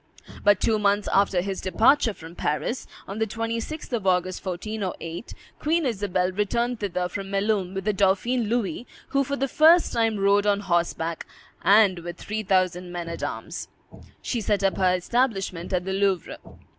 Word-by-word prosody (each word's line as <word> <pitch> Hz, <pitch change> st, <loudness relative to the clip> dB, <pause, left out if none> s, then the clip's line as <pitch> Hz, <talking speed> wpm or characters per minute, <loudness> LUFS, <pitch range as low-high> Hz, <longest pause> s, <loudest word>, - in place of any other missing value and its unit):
But 205 Hz, -2 st, +5 dB
two 220 Hz, -1 st, +2 dB
months 205 Hz, 0 st, +2 dB
after 195 Hz, -2 st, +3 dB
his 195 Hz, +1 st, -4 dB
departure 225 Hz, +4 st, +3 dB
from 165 Hz, +1 st, -11 dB
Paris, 175 Hz, -, -2 dB, 0.2 s
on 195 Hz, +2 st, -5 dB
the 220 Hz, -, +1 dB
26th 230 Hz, +7 st, -4 dB
of 215 Hz, -5 st, -1 dB
August, 185 Hz, 0 st, +1 dB
1408, 185 Hz, -1 st, -5 dB, 0.2 s
Queen 320 Hz, +1 st, +1 dB
Isabel 190 Hz, -6 st, 0 dB
returned 235 Hz, +5 st, -1 dB
thither 180 Hz, -3 st, -1 dB
from 195 Hz, +1 st, -6 dB
Melun, 195 Hz, -2 st, 0 dB
with 195 Hz, -, -3 dB
the 210 Hz, -, +2 dB
dauphin 200 Hz, +5 st, +2 dB
Louis, 230 Hz, -1 st, -1 dB, 0.2 s
who 275 Hz, 0 st, +2 dB
for 280 Hz, +1 st, -2 dB
the 275 Hz, 0 st, -1 dB
first 325 Hz, +5 st, +5 dB
time 225 Hz, -2 st, +1 dB
rode 200 Hz, +1 st, +3 dB
on 205 Hz, 0 st, +2 dB
horseback, 170 Hz, -3 st, -1 dB, 0.3 s
and 200 Hz, -2 st, +5 dB
with 175 Hz, 0 st, -7 dB
three 215 Hz, +1 st, -4 dB
thousand 185 Hz, -2 st, 0 dB
men 175 Hz, -1 st, -5 dB
at 170 Hz, -, -6 dB
arms. -, -, -5 dB, 0.6 s
She 240 Hz, -, -2 dB
set 205 Hz, -1 st, 0 dB
up 195 Hz, -, +2 dB
her 185 Hz, -1 st, +3 dB
establishment 195 Hz, -4 st, -1 dB
at 180 Hz, -1 st, 0 dB
the 190 Hz, -, -2 dB
Louvre. 195 Hz, -3 st, 0 dB
200 Hz, 170 wpm, -25 LUFS, 185-225 Hz, 0.6 s, But